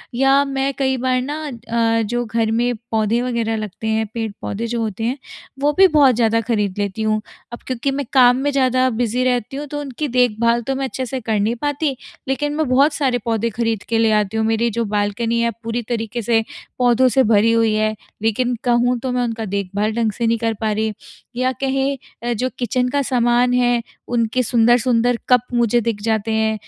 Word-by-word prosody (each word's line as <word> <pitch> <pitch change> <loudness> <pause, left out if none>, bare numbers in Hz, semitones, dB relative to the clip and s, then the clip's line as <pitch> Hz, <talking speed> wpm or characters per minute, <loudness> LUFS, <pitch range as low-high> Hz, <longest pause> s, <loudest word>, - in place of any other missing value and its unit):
या 270 +2 +4
मैं 275 0 -1
कई 265 -1 +1
बार 255 0 0
ना 290 +4 -4
अ, 230 -2 0
जो 240 +3 -2
घर 225 -1 0
में 240 +2 +1 0.2
पौधे 220 +1 +1
वग़ैरह 235 -3 -1
लगते 215 +1 -5
हैं, 220 0 +1
पेड़-पौधे 225 0 -4
जो 235 0 -2
होते 220 0 -3
हैं 250 +4 -1 0.4
वो 290 +1 +2
भी 385 - +8
बहुत 285 -7 +4
ज़्यादा 230 -1 +2
ख़रीद 210 -4 -1
लेती 205 +1 -2
हूँ। 215 0 +1 0.3
अब - - -6
क्योंकि 255 +1 -1
मैं 280 +1 -3
काम 250 -1 +6
में 290 - +1
ज़्यादा 255 -1 +2
बिज़ी 245 +1 -1
रहती 250 +1 -1
हूँ 295 - -5
तो 290 +1 -5
उनकी 285 +1 -4
देखभाल 235 -1 +2
तो 270 - 0
मैं 270 0 -2
अच्छे 260 0 -4
से 260 +1 -4
कर 220 -2 -1
नहीं 220 +4 0
पाती, 290 +2 -1 0.3
लेकिन 290 +2 -1
मैं 310 -1 0
बहुत 275 +4 +4
सारे 265 -5 0
पौधे 230 0 0
ख़रीद 225 -1 -2
के 230 - +1
ले 225 -1 +3
आती 210 0 +1
हूँ। 220 - +1
मेरी 225 +1 +1
जो 230 +1 -2
बालकनी 210 +3 -1
है 235 0 +1
पूरी 230 +1 -2
तरीके 230 0 -2
से 225 +1 +2 0.4
पौधों 250 +1 +4
से 265 +1 +3
भरी 220 0 +4
हुई 225 -1 +2
है 215 0 0 0.3
लेकिन 240 +3 0
कहूँ 245 0 +2
तो 255 +2 -3
मैं 250 0 0
उनका 225 -2 -3
देख़भाल 200 +2 -2
ढंग 230 -2 +1
से 230 +3 -2
नहीं 230 - +2
कर 225 0 -1
पा 220 -1 0
रही 220 +1 -1 0.4
या 255 +1 +1
कहें, 270 -2 -3
जो 255 +4 -1
किचन 250 +1 0
का 285 +1 0
सामान 245 -1 +2
है, 245 -1 +2 0.3
उनके 240 +1 0
सुंदर-सुंदर 240 +1 +3
कप 250 -2 +5
मुझे 240 0 +2
दिख 220 -2 -2
जाते 220 0 -1
हैं 220 0 +1
235 Hz, 205 wpm, -19 LUFS, 225-255 Hz, 0.4 s, भी